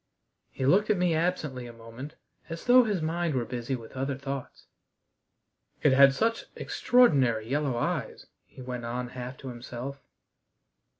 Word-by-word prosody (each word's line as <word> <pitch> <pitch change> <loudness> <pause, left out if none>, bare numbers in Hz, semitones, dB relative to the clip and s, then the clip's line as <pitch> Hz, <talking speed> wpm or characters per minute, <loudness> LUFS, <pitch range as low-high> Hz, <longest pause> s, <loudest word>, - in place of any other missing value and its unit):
He 130 - -4
looked 200 +10 +4
at 210 - +3
me 180 -2 +2
absently 155 -7 -1
a - - -8
moment, 115 +5 -10 0.3
as 165 0 -7
though 250 0 +7
his 200 -7 -1
mind 165 -1 -1
were 120 -2 0
busy 125 +2 -3
with 115 0 -11
other 135 +1 -2
thoughts. 135 -1 -6 1.2
"It 145 - +5
had 135 0 +7
such 225 +4 0
extraordinary 135 - +3
yellow 140 -1 0
eyes," - - -2 0.2
he 130 - -13
went 125 -1 -5
on 125 +1 -3
half 125 +1 -7
to 135 - -8
himself. 125 +3 -7
135 Hz, 155 wpm, -28 LUFS, 125-165 Hz, 1.2 s, though